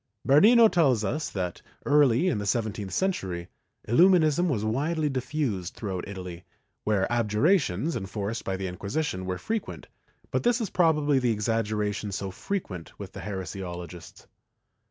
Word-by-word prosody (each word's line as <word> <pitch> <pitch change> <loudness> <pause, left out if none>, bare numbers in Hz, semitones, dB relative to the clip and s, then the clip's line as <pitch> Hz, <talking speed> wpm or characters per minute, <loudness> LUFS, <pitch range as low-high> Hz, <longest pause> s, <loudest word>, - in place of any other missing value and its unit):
^ - - -9
Bernino 220 - +7
tells 135 - +2
us 150 +7 -2
that, 90 -3 -4 0.2
early 145 +2 +4
in 110 - +1
the 105 - -4
seventeenth 105 -3 -1
century, 95 - -2 0.4
Illu 165 - +6
minism 175 -1 +3
was 110 -9 -1
widely 150 +7 0
diffused 125 - -2
throughout 95 -5 -4
Italy, 90 -3 -7 0.4
where 105 -3 +2
abjurations 120 - +2
enforced 105 +1 -4
by 95 0 -2
the 95 - -4
Inquisition 95 - -3
were 90 -1 -2
frequent, 220 - -4 0.5
but - - +1
this 240 0 +2
is 220 -5 -3
probably 150 -5 +3
the 125 -1 +1
exaggeration 105 -1 -1
so 95 0 -4
frequent 95 - -5
with 100 -2 -9
heresiologists. 95 -3 -7
110 Hz, 140 wpm, -27 LUFS, 95-150 Hz, 0.5 s, Bernino